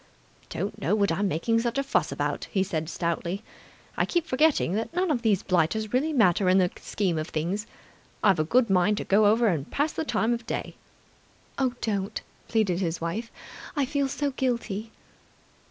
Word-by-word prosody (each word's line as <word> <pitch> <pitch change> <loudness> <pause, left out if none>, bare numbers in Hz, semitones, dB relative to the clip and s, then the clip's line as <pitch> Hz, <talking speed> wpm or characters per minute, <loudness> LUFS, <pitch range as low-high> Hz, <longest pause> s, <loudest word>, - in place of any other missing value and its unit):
"Don't - - -4
know 175 +9 +2
what 200 -4 +2
I'm 200 +5 +1
making 225 +7 +1
such 235 +2 -1
a 275 - +1
fuss 275 - 0
about," - - -2
he 190 -3 +1
said 160 -4 -3
stoutly. 170 +4 -2 0.5
"I - - +2
keep 345 -2 0
forgetting 290 - +2
that 220 +3 -2
none 360 -2 +1
of 250 -5 0
these 215 -5 +2
blighters 195 +5 +1
really 285 +6 +2
matter 195 - +3
in 185 - +5
the 180 -2 +3
scheme 180 -6 -1
of 155 - -3
things. 185 +8 -2 0.6
I've 195 -5 +4
a - - +3
good 235 +9 +3
mind 195 +1 +3
to - - -2
go 205 +2 +4
over 225 +3 +4
and 160 -7 -1
pass 295 +2 0
the - - -2
time 235 -4 +1
of 235 -1 -5
day." - - -3 1.1
"Don't!" 200 -3 -1 0.3
pleaded 200 -6 +1
his 170 -3 -1
wife. 205 +8 -3 0.4
"I 285 -2 +2
feel 280 0 0
so 285 +1 -2
guilty." 235 -5 -2
210 Hz, 185 wpm, -27 LUFS, 180-240 Hz, 1.1 s, in